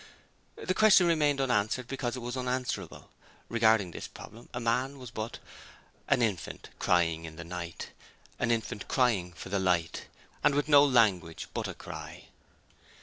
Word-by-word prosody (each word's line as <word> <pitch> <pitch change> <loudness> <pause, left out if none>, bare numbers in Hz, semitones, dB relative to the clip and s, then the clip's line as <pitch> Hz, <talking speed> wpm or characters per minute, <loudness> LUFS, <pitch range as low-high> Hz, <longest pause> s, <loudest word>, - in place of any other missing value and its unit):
The 185 - -2
question 195 -2 +6
remained 150 -4 +2
unanswered 125 -1 +1
because 130 -2 -3
it 125 - -6
was 120 +1 -4
unanswerable. 125 0 -3 0.4
Regarding 110 -5 +3
this - - -6
problem 115 +3 -12
man 125 +4 0
was 125 -3 -9
but 110 0 -5 0.7
'An 130 -4 +3
infant 105 -6 -3
crying 85 -2 +2
in 80 -1 -9
the 85 - -7
night, 85 -1 -6 0.5
An - - 0
infant 110 -3 -2
crying 115 -9 +2
for 85 - -9
the 100 +1 0
light 90 -3 0 0.4
And 140 - +4
with 145 0 +1
no 145 -2 +8
language 105 - +2
but - - -2
a - - -6
cry.' - - -9
115 Hz, 150 wpm, -30 LUFS, 90-130 Hz, 0.7 s, no